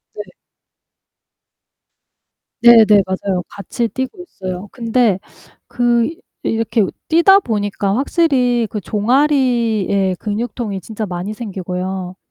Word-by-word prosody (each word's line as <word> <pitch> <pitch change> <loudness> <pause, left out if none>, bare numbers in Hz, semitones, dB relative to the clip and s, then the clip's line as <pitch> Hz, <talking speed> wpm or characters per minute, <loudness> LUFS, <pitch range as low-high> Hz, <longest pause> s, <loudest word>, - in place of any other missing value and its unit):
네. - - -8 2.3
네네 235 -2 +8 0.2
맞아요. 190 0 -2
같이 230 +4 -3
뛰고 260 - -5
있어요. 185 - -7
근데 230 -4 +1 0.5
그 240 -1 +1 0.4
이 - - -3
이렇게 225 0 +1 0.2
뛰다 340 +4 +6
보니까 205 - -2
확실히 255 -4 +1
그 210 - -4
종아리에 230 -5 +1
근육통이 215 -2 -4
진짜 220 +3 -5
많이 185 +3 -5
생기고요. 185 -3 -5
220 Hz, 220 characters per minute, -17 LUFS, 195-245 Hz, 2.3 s, 네네